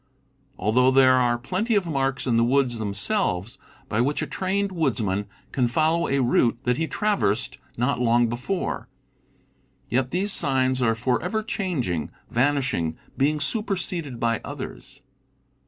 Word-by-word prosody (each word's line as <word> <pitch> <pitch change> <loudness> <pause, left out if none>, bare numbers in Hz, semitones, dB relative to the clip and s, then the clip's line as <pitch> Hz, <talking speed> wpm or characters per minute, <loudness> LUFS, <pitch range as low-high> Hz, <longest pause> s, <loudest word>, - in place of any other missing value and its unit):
Although 120 +6 +3
there 130 -1 +6
are 120 -2 +3
plenty 185 - -1
of 200 -3 +2
marks 135 -4 -1
in 120 -3 +1
the 115 - +4
woods 125 -1 +2
themselves 105 - -1 0.3
by 105 - 0
which 145 +4 0
a - - -1
trained 195 +6 -1
woodsman 110 - -1 0.2
can 125 -3 +1
follow 160 +6 +1
a 140 -1 +1
route 120 -1 +3
that 125 -1 +1
he 165 - 0
traversed 155 - 0 0.2
not 125 +3 0
long 120 0 +4
before, 125 +11 -3 1.0
yet 125 +2 +1
these 190 +6 0
signs 130 -2 +2
are 115 -2 +2
forever 145 - -1
changing, 165 - -2 0.2
vanishing, 130 - +1 0.2
being 150 +3 +1
superseded 175 - -3
by 115 -2 0
others. - - -8
130 Hz, 140 wpm, -24 LUFS, 120-165 Hz, 1.0 s, there